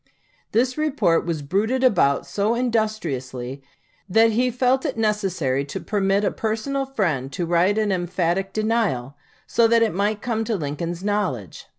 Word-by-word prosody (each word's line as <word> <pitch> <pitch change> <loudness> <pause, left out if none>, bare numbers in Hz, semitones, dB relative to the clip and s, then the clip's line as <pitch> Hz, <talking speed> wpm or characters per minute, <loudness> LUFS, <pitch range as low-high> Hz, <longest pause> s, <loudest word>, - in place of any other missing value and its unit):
This 255 +5 +1
report 225 - +1
was 160 -4 -2
bruited 220 - 0
about 140 - +3
so 210 +3 0
industriously 150 - -2 0.5
that 225 +4 +5
he 245 +3 +2
felt 255 +2 +1
it - - -3
necessary 190 -11 0
to - - -5
permit 200 -1 0
a 195 - +1
personal 265 +5 -2
friend 165 - -1
to 175 - -2
write 175 +5 +2
an 215 -2 +1
emphatic 180 +1 -1
denial, 215 - -1 0.3
so 230 - +3
that 230 0 +4
it 220 - 0
might 205 +3 0
come 225 -1 -1
to 225 - -1
Lincoln's 165 +2 -4
knowledge. 185 - -2
205 Hz, 155 wpm, -23 LUFS, 170-225 Hz, 0.5 s, that